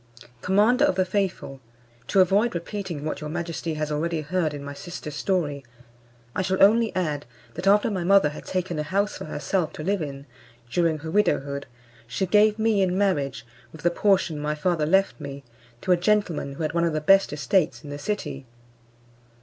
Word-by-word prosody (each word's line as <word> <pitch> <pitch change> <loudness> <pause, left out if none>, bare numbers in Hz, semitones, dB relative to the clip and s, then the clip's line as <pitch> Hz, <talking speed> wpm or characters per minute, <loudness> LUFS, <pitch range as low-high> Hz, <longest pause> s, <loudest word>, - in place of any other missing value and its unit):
Commander 215 +8 +3
of 290 - +3
the 185 0 +2
faithful, 185 -8 -2 0.5
to 195 - +4
avoid 200 +4 +2
repeating 170 -3 -5
what 155 - -3
your 150 - -5
majesty 165 0 -3
has 155 0 -3
already 160 +2 -1
heard 160 +1 -1
in 145 -1 -7
my 145 0 -6
sister's 150 0 -7
story, 150 -6 -1 0.7
I - - +1
shall 190 0 -1
only 225 +2 +5
add, 150 -7 -2 0.3
that 185 - -4
after 210 +3 +4
my 185 -3 -2
mother 195 -3 +5
had 150 - -9
taken 180 -3 -2
a - - +1
house 200 +7 -1
for - - -7
herself 180 -5 -2
to 155 - -7
live 195 +2 0
in, 140 -2 -6 0.5
during 165 -1 +2
her 160 +1 -7
widowhood, 140 -8 0 0.4
she 115 +11 -1
gave 210 +3 +4
me 220 -2 +2
in 185 -1 +1
marriage, 140 - 0 0.3
with 160 - -13
the 175 - +3
portion 185 -4 +2
my 150 +1 -2
father 155 -1 0
left 190 -1 +2
me, 140 -1 -7 0.4
to 185 - -1
a 180 - +6
gentleman 180 -7 0
who 150 - -5
had 155 0 -1
one 170 0 +1
of 170 -2 +1
the 155 - 0
best 195 +6 +4
estates 150 +5 0
in 145 - -8
the 145 - -6
city. 145 -7 -4
170 Hz, 190 wpm, -25 LUFS, 150-195 Hz, 0.7 s, a